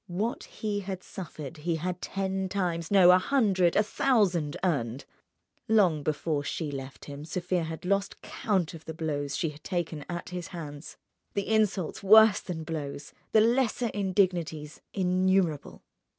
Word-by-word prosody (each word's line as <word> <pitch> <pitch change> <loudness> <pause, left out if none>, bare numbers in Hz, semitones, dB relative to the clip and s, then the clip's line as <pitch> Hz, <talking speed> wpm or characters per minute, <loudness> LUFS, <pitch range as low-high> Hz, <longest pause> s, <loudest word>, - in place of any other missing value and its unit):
What 205 +7 -2
he 210 -2 -3
had 190 -2 -5
suffered 160 -4 -8
he 165 +2 -1
had 180 +2 -3
ten 190 -1 -2
times—no, 180 0 +4
a 180 - +6
hundred, 190 -7 +2
a 210 - +5
thousand—earned. 175 - 0 0.6
Long 190 -9 +4
before 150 0 -1
she 150 +1 -3
left 135 -1 -7
him 145 0 -8
Sofia 175 +1 -1
had 160 +2 -7
lost 200 +1 0
count 190 -7 -1
of 160 -1 -11
the 160 - -6
blows 145 -3 -2
she 165 - 0
had 150 0 -13
taken 170 -5 -3
at 175 0 -5
his 180 -2 -5
hands, 150 -4 -8 0.4
the 200 -1 -1
insults 215 -5 +1
worse 215 +1 +7
than 165 -3 -5
blows, 150 -3 -5 0.2
the 220 - +6
lesser 240 0 +2
indignities 180 -6 0
innumerable. 185 -4 +1
180 Hz, 145 wpm, -28 LUFS, 155-195 Hz, 0.6 s, worse